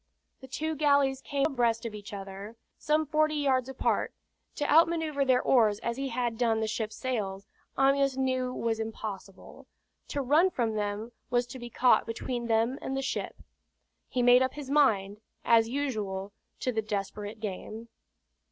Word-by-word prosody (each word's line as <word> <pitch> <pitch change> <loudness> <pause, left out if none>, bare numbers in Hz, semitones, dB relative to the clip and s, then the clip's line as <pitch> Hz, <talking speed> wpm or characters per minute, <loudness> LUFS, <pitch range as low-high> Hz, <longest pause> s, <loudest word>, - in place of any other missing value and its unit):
The 265 - -11
two 315 +4 -3
galleys 280 -2 +3
came 280 -1 -1
on - - 0
abreast 235 -2 +1
of 230 - -4
each 205 -1 -9
other, 195 +2 -8 0.2
some 305 +1 +1
forty 310 +1 +1
yards 265 -3 +1
apart. 265 - 0 0.4
To 290 - -2
out 325 +3 +6
manoeuvre 320 -4 -1
their 255 -1 +3
oars 220 -5 +4
as 235 - -2
he 275 0 -2
had 240 -1 -2
done 225 -2 +2
the 220 - 0
ship's 220 0 -3
sails, 200 -6 -3 0.3
Amyas 275 0 +3
knew 255 -1 0
was 230 -2 -2
impossible. 210 -3 -7 0.4
To 280 - -2
run 305 +8 +4
from 235 -9 -1
them, 210 +2 -3 0.2
was 245 -1 +2
to 245 +2 -9
be 240 0 -7
caught 245 +1 +3
between 235 +1 -3
them 230 +4 +1
and 270 - -3
the 270 - -2
ship. - - -4 0.7
He 250 -2 0
made 245 +1 +7
up 260 0 0
his 285 -2 -7
mind, 210 -8 +2 0.2
as 225 -1 +5
usual, 210 -8 -3 0.3
to 255 - 0
the 220 -2 -1
desperate 210 +1 -4
game. 215 +2 -6
245 Hz, 170 wpm, -29 LUFS, 220-270 Hz, 0.7 s, made